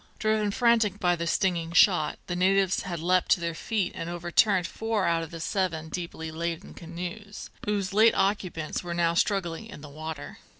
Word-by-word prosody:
Driven 215 -1 +1
frantic 225 -3 +2
by 175 -2 +2
the 170 0 -3
stinging 170 -3 0
shot, 170 -3 +4
the 175 - -3
natives 190 +1 +2
had 175 -3 -5
leapt 180 +2 +2
to - - -1
their 170 -1 -2
feet 195 +2 -2
and 165 - -5
overturned 175 +2 +2
four 225 0 -1
out 165 -1 +2
of 165 - -6
the 165 - -8
seven 165 -2 -2
deeply 160 -1 -5
laden 170 +2 -4
canoes, 180 +5 -7
whose 200 -2 -1
late 220 +2 +5
occupants 185 -6 -1
were 175 -1 -4
now 170 -1 +2
struggling 180 +1 0
in 150 - -11
the 150 - -10
water. 155 0 -7
175 Hz, 180 wpm, -27 LUFS, 165-200 Hz, -, late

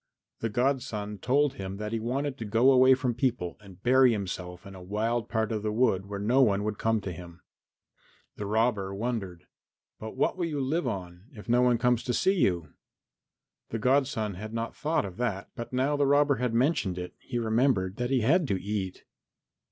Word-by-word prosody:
The 115 - -2
godson 115 -4 -1
told 140 +6 +2
him 95 0 -6
that 105 +1 -4
he 115 - -1
wanted 130 +5 -2
to - - -3
go 115 +6 +4
away 130 0 +6
from 125 -1 -1
people 120 -8 -1
and 95 -1 -15
bury 130 0 +5
himself 90 -3 -5
in 100 - -10
a 95 - -10
wild 110 +5 -1
part 110 -1 0
of 110 -2 -1
the 105 0 -1
wood 105 -4 +1
where 100 0 -5
no 115 +7 +3
one 100 -5 +3
would 105 -1 -3
come 110 -1 +1
to 95 - -5
him. 85 0 -11 0.9
The 105 - -5
robber 105 -3 0
wondered. 100 -6 -4 0.5
"But 110 0 -7
what - - +1
will 175 -2 -1
you 150 -3 -3
live 140 +3 0
on 90 -4 -5
if 105 -4 -11
no 120 +1 +3
one 125 -1 +4
comes 125 0 +2
to 125 - 0
see 190 - +3
you?" 85 - 0 1.0
The 115 - -3
godson 125 -3 +1
had 110 +4 -7
not 115 0 -3
thought 155 -6 0
of 95 -1 -8
that, 110 -5 -2
but 120 -3 -6
now 130 +3 +1
the 145 -1 +2
robber 145 0 +4
had 125 -2 -1
mentioned 120 - +1
it 90 0 -6
he 120 - -5
remembered 110 -4 +1
that 125 0 -2
he 135 -2 +2
had 155 +8 +3
to 95 -6 0
eat. 95 -2 -4
115 Hz, 200 wpm, -28 LUFS, 100-130 Hz, 1.0 s, away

